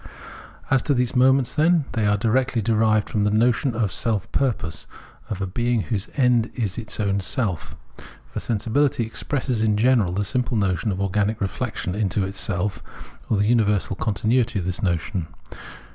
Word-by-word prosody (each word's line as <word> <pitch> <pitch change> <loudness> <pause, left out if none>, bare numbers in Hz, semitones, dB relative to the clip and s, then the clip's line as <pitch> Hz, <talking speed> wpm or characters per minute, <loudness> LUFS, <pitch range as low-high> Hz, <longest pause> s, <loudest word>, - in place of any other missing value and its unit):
As 130 -1 +4
to 145 - 0
these 125 0 0
moments, 130 0 +4
then, 160 0 +3
they 110 -4 0
are 105 0 +2
directly 120 +3 +1
derived 110 -1 +2
from 105 - -1
the 105 - +2
notion 120 +4 +2
of 110 -4 0
self 105 +2 0
purpose, 105 -12 -2 0.4
of 100 -2 -3
a - - 0
being 120 +4 0
whose 100 -2 -3
end 125 -4 +3
is 110 -4 -2
its 110 -1 -4
own 100 -1 +1
self. 100 - -1 0.6
For - - -2
Sensibility 120 +3 0
expresses 125 +1 -2
in 105 -2 +2
general 115 -5 +3
the 100 +3 -1
simple 125 +1 -1
notion 100 +1 0
of 95 - -4
organic 105 +2 0
reflexion 95 -2 -3
into 105 -1 0
itself, 95 0 -1 0.5
or 110 - +2
the 100 - +2
universal 105 -4 +2
continuity 110 +3 0
of 90 - -2
this 90 -1 -3
notion. 85 -1 -1
110 Hz, 165 wpm, -23 LUFS, 100-120 Hz, 0.6 s, As